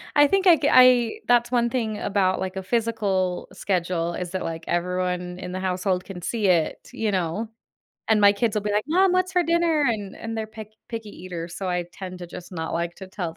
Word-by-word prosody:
I 290 Hz, 0 st, +7 dB
think 390 Hz, +4 st, +2 dB
I 345 Hz, -, +9 dB
c 290 Hz, -, 0 dB
I, 250 Hz, -2 st, +6 dB
that's 240 Hz, -1 st, +4 dB
one 240 Hz, -1 st, +2 dB
thing 225 Hz, -4 st, -2 dB
about, 195 Hz, -2 st, +1 dB
like, 190 Hz, 0 st, -4 dB
a 190 Hz, -, -3 dB
physical 200 Hz, -4 st, 0 dB
schedule, 175 Hz, -3 st, -1 dB
is 180 Hz, 0 st, -5 dB
that, 185 Hz, -, -3 dB
like, 165 Hz, 0 st, -5 dB
everyone 180 Hz, 0 st, -2 dB
in 180 Hz, -1 st, -6 dB
the 185 Hz, -, -3 dB
household 185 Hz, 0 st, 0 dB
can 180 Hz, -3 st, -9 dB
see 215 Hz, +2 st, -1 dB
it, 170 Hz, -4 st, +1 dB
you 220 Hz, -2 st, -1 dB
know? 185 Hz, +3 st, -1 dB, 0.6 s
And 215 Hz, -1 st, +5 dB
my 200 Hz, 0 st, +7 dB
kids 210 Hz, +1 st, -1 dB
will 210 Hz, -, 0 dB
be 210 Hz, -, -1 dB
like, 210 Hz, +1 st, +1 dB
"Mom, 365 Hz, +3 st, +4 dB
what's 370 Hz, 0 st, +1 dB
for 360 Hz, -1 st, +3 dB
dinner?" 335 Hz, -2 st, +2 dB
And 205 Hz, -4 st, -2 dB
and 225 Hz, 0 st, -6 dB
they're 220 Hz, -1 st, -3 dB
pick 220 Hz, -1 st, -10 dB, 0.2 s
picky 225 Hz, -3 st, -6 dB
eaters, 175 Hz, -3 st, -7 dB
so 190 Hz, -2 st, -4 dB
I 180 Hz, -1 st, -1 dB
tend 185 Hz, -1 st, -8 dB
to 175 Hz, -, -6 dB
just 175 Hz, +1 st, -10 dB
not 160 Hz, -3 st, -4 dB
like 170 Hz, +1 st, -2 dB
to 190 Hz, -, -9 dB
tell 175 Hz, -4 st, -5 dB
them, -, -, -30 dB
195 Hz, 230 wpm, -24 LUFS, 180-230 Hz, 0.6 s, I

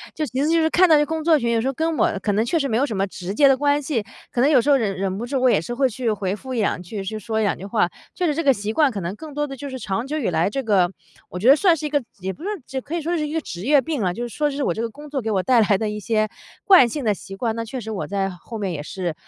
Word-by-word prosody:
就 310 Hz, -, -1 dB
其 260 Hz, 0 st, -3 dB
实 295 Hz, -, +2 dB
就 330 Hz, +1 st, +3 dB
是 320 Hz, -, +2 dB
看 365 Hz, +3 st, +5 dB
到 320 Hz, -, +6 dB
这 295 Hz, 0 st, +4 dB
工 320 Hz, +2 st, -3 dB
作 325 Hz, -2 st, +5 dB
群， 235 Hz, -4 st, 0 dB
有 230 Hz, -, +2 dB
时 235 Hz, -, -1 dB
候 270 Hz, -, 0 dB
跟 320 Hz, +2 st, -1 dB
我 -, -, +2 dB
可 205 Hz, -, -1 dB
能 210 Hz, +3 st, +1 dB
确 330 Hz, -, +1 dB
实 280 Hz, -3 st, 0 dB
没 225 Hz, -, +1 dB
有 270 Hz, -, +2 dB
什 230 Hz, -7 st, -4 dB
么 195 Hz, 0 st, +1 dB
直 185 Hz, -1 st, -6 dB
接 280 Hz, +6 st, +5 dB
的 270 Hz, -, +4 dB
关 290 Hz, +1 st, +2 dB
系， 265 Hz, -7 st, -2 dB, 0.3 s
可 -, -, -3 dB
能 270 Hz, +4 st, +4 dB
有 270 Hz, -5 st, +5 dB
时 285 Hz, -, -1 dB
候 280 Hz, -, +6 dB
忍 210 Hz, -6 st, -1 dB
忍 190 Hz, 0 st, -2 dB
不 230 Hz, -, -4 dB
住， 260 Hz, +1 st, -2 dB
我 255 Hz, -, +5 dB
也 235 Hz, -, +4 dB
是 240 Hz, -, -5 dB
会 265 Hz, +1 st, +2 dB
去 240 Hz, 0 st, -2 dB
回 195 Hz, -3 st, -1 dB
复 260 Hz, +3 st, -7 dB
一 240 Hz, -, -1 dB
两 200 Hz, -, 0 dB
句， 195 Hz, +3 st, -6 dB
去 215 Hz, +3 st, -4 dB
说 220 Hz, 0 st, -2 dB
两 205 Hz, -5 st, +1 dB
句 190 Hz, -, -8 dB
话。 200 Hz, -3 st, +1 dB, 0.3 s
确 360 Hz, -, -1 dB
实 300 Hz, -, +1 dB
这 325 Hz, -, -1 dB
个 275 Hz, -, +6 dB
习 210 Hz, -2 st, -4 dB
惯 295 Hz, +5 st, +3 dB
可 210 Hz, -6 st, -5 dB
能 170 Hz, +2 st, -3 dB
更 310 Hz, +2 st, -9 dB
多 295 Hz, +1 st, -1 dB
地 275 Hz, -2 st, -8 dB
就 280 Hz, +2 st, -6 dB
是 260 Hz, -, -5 dB
长 230 Hz, +1 st, -3 dB
久 305 Hz, +2 st, -2 dB
以 265 Hz, -10 st, 0 dB
来， 170 Hz, +1 st, +1 dB
这 270 Hz, +6 st, -3 dB
个 195 Hz, -6 st, +3 dB, 0.4 s
我 -, -, -7 dB
觉 215 Hz, +8 st, +3 dB
得 275 Hz, -, +9 dB
算 350 Hz, 0 st, +4 dB
是 310 Hz, -, -5 dB
一 -, -, -1 dB
个 290 Hz, -1 st, +1 dB, 0.2 s
也 190 Hz, +1 st, -2 dB
不 240 Hz, -, -13 dB
是 -, -, -4 dB, 0.2 s
这 265 Hz, -, -4 dB
可 290 Hz, +6 st, -6 dB
以 340 Hz, -, -1 dB
说 340 Hz, +3 st, -1 dB
是 300 Hz, -1 st, -1 dB
一 295 Hz, -, -6 dB
个 325 Hz, -, 0 dB
职 175 Hz, -, -7 dB
业 285 Hz, +1 st, +5 dB
病 290 Hz, -1 st, -3 dB
啦。 180 Hz, -3 st, 0 dB
就 235 Hz, -, -5 dB
是 -, -, -6 dB
说 295 Hz, -1 st, +1 dB
是 280 Hz, 0 st, -3 dB
我 -, -, +1 dB
这 220 Hz, -, -4 dB
个 230 Hz, -, -2 dB
工 295 Hz, +6 st, -12 dB
作 280 Hz, -2 st, -2 dB
给 225 Hz, -, -3 dB
我 190 Hz, -3 st, +1 dB
带 250 Hz, +1 st, +4 dB
来 205 Hz, -2 st, +3 dB
的 215 Hz, +1 st, -2 dB
一 210 Hz, 0 st, -4 dB
些 215 Hz, +1 st, 0 dB, 0.3 s
惯 370 Hz, -11 st, +7 dB
性 285 Hz, +4 st, -4 dB
的 215 Hz, -3 st, +2 dB
习 195 Hz, 0 st, -9 dB
惯， 225 Hz, +2 st, -1 dB
那 230 Hz, -, -3 dB
确 250 Hz, +3 st, -6 dB
实 220 Hz, 0 st, -6 dB
我 205 Hz, -, -4 dB
在 195 Hz, -1 st, -1 dB
后 195 Hz, +5 st, -9 dB
面 200 Hz, -3 st, -2 dB
也 155 Hz, -4 st, -4 dB
是， 175 Hz, +2 st, -4 dB
240 Hz, 385 characters per minute, -22 LUFS, 205-290 Hz, 0.4 s, 得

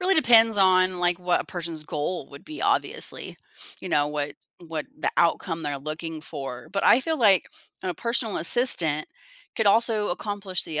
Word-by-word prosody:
really 375 Hz, +2 st, +3 dB
depends 230 Hz, -, +5 dB
on, 185 Hz, -1 st, +3 dB
like, 175 Hz, 0 st, +1 dB
what 180 Hz, -1 st, 0 dB
a -, -, -6 dB
person's 165 Hz, -3 st, -5 dB
goal 150 Hz, +1 st, -4 dB
would 140 Hz, -, -13 dB
be, 310 Hz, -, -9 dB
obviously, 405 Hz, +1 st, -2 dB, 0.4 s
you 185 Hz, -, -7 dB
know, 145 Hz, -3 st, +1 dB
what 145 Hz, -1 st, -3 dB, 0.3 s
what 160 Hz, -2 st, -5 dB
the -, -, -1 dB
outcome 165 Hz, -1 st, 0 dB
they're 145 Hz, -2 st, -3 dB
looking 155 Hz, +2 st, -6 dB
for, 135 Hz, -6 st, -8 dB
but, 200 Hz, +1 st, -2 dB
I 245 Hz, -, +6 dB
feel, 320 Hz, +3 st, -2 dB
like, 200 Hz, -6 st, +4 dB, 0.4 s
a 185 Hz, -2 st, -3 dB
personal 230 Hz, +1 st, -1 dB
assistant 165 Hz, -, +3 dB, 0.5 s
could 220 Hz, -, 0 dB
also 220 Hz, 0 st, +4 dB
accomplish 195 Hz, 0 st, -4 dB
the 155 Hz, -2 st, -4 dB
180 Hz, 170 wpm, -24 LUFS, 155-220 Hz, 0.5 s, I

